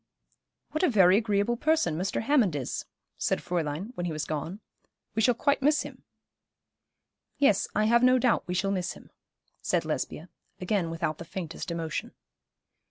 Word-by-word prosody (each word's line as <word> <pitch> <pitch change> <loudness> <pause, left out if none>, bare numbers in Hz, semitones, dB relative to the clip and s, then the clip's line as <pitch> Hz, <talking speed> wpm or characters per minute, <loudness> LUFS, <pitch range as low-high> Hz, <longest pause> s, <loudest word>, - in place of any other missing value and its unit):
'What 310 - -1
a 365 - +4
very 190 -6 +6
agreeable 210 +1 +1
person 310 - +2
Mr. 185 +6 -2
Hammond 230 - +3
is,' 135 -4 -3 0.3
said - - +1
Fräulein, 170 +4 -3
when 175 -6 -3
he - - -2
was 155 -1 -3
gone. 155 +6 -4 0.5
'We 220 - 0
shall 245 +2 +4
quite 280 +3 +1
miss 300 +2 +3
him.' - - -10 1.4
'Yes, 210 -8 +3
I 215 - +3
have 235 +2 +4
no 255 +1 +6
doubt 250 -2 +1
we 180 - -2
shall 195 +2 +1
miss 180 -2 -1
him,' - - -16 0.5
said - - 0
Lesbia, - - -3 0.3
again 185 -2 0
without 165 -2 -2
the - - -5
faintest 170 0 -6
emotion. 165 -2 -4
195 Hz, 165 wpm, -28 LUFS, 170-240 Hz, 1.4 s, very